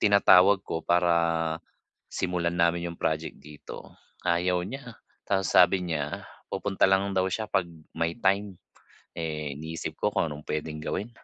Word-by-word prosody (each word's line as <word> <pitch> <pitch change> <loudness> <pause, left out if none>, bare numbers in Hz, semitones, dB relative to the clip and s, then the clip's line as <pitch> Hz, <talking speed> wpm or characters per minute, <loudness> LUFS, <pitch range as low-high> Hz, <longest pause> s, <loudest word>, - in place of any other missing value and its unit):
tinatawag 100 -1 +6
ko 80 - -3
para, 85 0 +3 1.0
simulan 85 -1 -1
namin 85 0 +2
'yong 85 - -11
project 80 +1 -2
dito, 75 0 -11 0.3
ayaw 90 +1 +2
niya. 125 +1 -8 0.2
Tapos 95 -2 0
sabi 90 0 +5
niya, 75 -3 -3 0.2
pupunta 95 -1 +1
lang 100 +1 +2
daw 95 0 +2
siya 110 +3 -2
'pag 90 -4 0 0.3
may 85 +6 -1
time. 100 -2 +1 0.6
Eh, 75 -3 -3
iniisip 80 +1 -6
ko - - 0
kung 80 - +1
anong 75 0 -8
pwedeng 75 0 -3
gawin. 95 +8 -3
85 Hz, 145 wpm, -27 LUFS, 80-95 Hz, 1.0 s, tinatawag